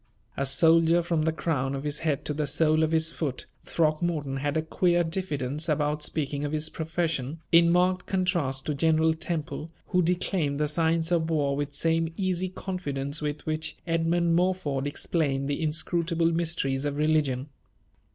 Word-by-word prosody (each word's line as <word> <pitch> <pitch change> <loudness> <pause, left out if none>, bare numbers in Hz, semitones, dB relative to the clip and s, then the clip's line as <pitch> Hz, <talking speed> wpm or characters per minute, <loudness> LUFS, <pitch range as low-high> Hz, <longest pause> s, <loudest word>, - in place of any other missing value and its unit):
A 140 - -1
soldier 165 +4 +4
from 165 -2 0
the 160 +1 +1
crown 140 -4 -1
of 135 - -5
his 150 0 -3
head 150 -3 -1
to 150 - -1
the 150 0 -2
sole 155 +1 +2
of 160 - +2
his 160 0 +2
foot, 145 -6 -4 0.2
Throckmorton 155 -3 0
had 145 +2 -1
a 155 - 0
queer 175 +2 +2
diffidence 155 -4 -2
about 150 0 0
speaking 145 -2 -1
of 145 - -2
his 155 0 0
profession, 160 -3 -2
in 170 0 +6
marked 180 +1 +2
contrast 175 -8 0
to 150 - -1
General 160 +2 +3
Temple, 160 -1 -4 0.2
who 180 -2 +3
declaimed 170 -4 0
the 150 - +1
science 165 +2 +1
of 165 -2 +1
war 145 -3 +1
with 145 0 -3
same 165 +2 +1
easy 185 -1 -1
confidence 150 -6 -4
with 150 0 -3
which 155 0 -2
Edmund 165 0 +1
Morford 170 -7 0
explained 140 -2 -1
the 145 +2 -2
inscrutable 165 +1 0
mysteries 160 -5 -1
of 145 -1 -2
religion. 150 -3 +1
160 Hz, 165 wpm, -27 LUFS, 145-170 Hz, 0.2 s, in